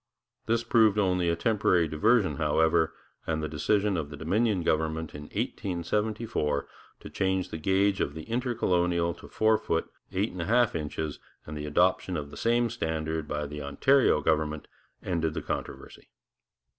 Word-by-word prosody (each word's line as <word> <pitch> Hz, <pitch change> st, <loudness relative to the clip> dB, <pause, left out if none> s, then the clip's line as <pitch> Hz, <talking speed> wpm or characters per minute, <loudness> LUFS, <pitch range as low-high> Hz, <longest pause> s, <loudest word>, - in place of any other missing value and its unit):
This 115 Hz, +1 st, +1 dB
proved 110 Hz, -3 st, +4 dB
only 90 Hz, -4 st, +2 dB
a 85 Hz, -, +2 dB
temporary 95 Hz, -5 st, +2 dB
diversion, 95 Hz, +8 st, +2 dB
however, 80 Hz, +1 st, +2 dB, 0.4 s
and 80 Hz, -1 st, -1 dB
the -, -, -1 dB
decision 100 Hz, +6 st, +1 dB
of 75 Hz, -3 st, -3 dB
the 75 Hz, -, -8 dB
Dominion 95 Hz, +4 st, +1 dB
government 80 Hz, 0 st, -1 dB
in 75 Hz, 0 st, -8 dB
1874 100 Hz, -2 st, -2 dB, 0.3 s
to -, -, -9 dB
change 95 Hz, -1 st, 0 dB
the 80 Hz, -, -6 dB
gauge 95 Hz, +3 st, +2 dB
of 70 Hz, -, -2 dB
the 80 Hz, -, -6 dB
Intercolonial 90 Hz, -8 st, 0 dB
to -, -, -13 dB
four 110 Hz, 0 st, +2 dB
feet 80 Hz, 0 st, -1 dB, 0.3 s
eight 100 Hz, +4 st, 0 dB
and 90 Hz, -, -5 dB
a -, -, -2 dB
half 120 Hz, +2 st, +3 dB
inches, 75 Hz, -1 st, -4 dB, 0.3 s
and 75 Hz, -, -7 dB
the 75 Hz, 0 st, -5 dB
adoption 90 Hz, +3 st, +2 dB
of 70 Hz, -1 st, -6 dB
the -, -, -10 dB
same 120 Hz, 0 st, +1 dB
standard 80 Hz, -1 st, -2 dB
by 75 Hz, 0 st, -2 dB
the 75 Hz, +1 st, -6 dB
Ontario 75 Hz, -, +3 dB
government, 75 Hz, 0 st, 0 dB, 0.4 s
ended 80 Hz, -4 st, -1 dB
the -, -, -2 dB
controversy. -, -, -6 dB
85 Hz, 160 wpm, -28 LUFS, 80-105 Hz, 0.4 s, proved